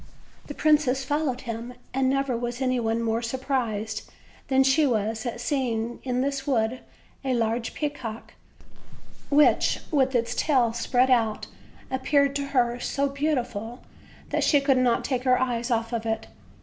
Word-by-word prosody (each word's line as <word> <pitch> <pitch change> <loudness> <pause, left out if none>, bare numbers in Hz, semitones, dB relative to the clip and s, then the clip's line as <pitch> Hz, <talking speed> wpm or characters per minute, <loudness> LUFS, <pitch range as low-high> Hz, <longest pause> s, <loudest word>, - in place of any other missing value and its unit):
The 290 - -7
princess 295 -4 +3
followed 290 -2 -1
him, 235 0 -6 0.2
and 265 0 +2
never 275 -2 0
was 240 +1 -3
any 255 -2 +1
one 225 0 0
more 225 0 0
surprised 230 -4 -2 0.4
than 265 0 +4
she 275 +3 +4
was 220 -1 -1
at 235 0 -4
seeing 240 -3 -1
in 250 -1 -1
this 275 0 -2
wood 245 -2 +1 0.4
a 260 -2 0
large 230 0 -1
peacock, 260 -7 -5 1.0
which, 295 +1 +4
with 265 -4 +2
its 235 -1 +1
tail 255 -7 +2
spread 250 +2 +2
out, 225 -3 +2 0.5
appeared 275 +1 +2
to 280 - -2
her 245 -3 +1
so 280 +2 -1
beautiful 250 -6 -2 0.5
that - - 0
she 290 - +4
could 275 -2 +3
not 245 -2 +2
take 255 -3 -1
her 255 -1 +3
eyes 240 -1 -1
off 230 0 -1
it. 225 -1 -2
250 Hz, 150 wpm, -26 LUFS, 230-275 Hz, 1.0 s, than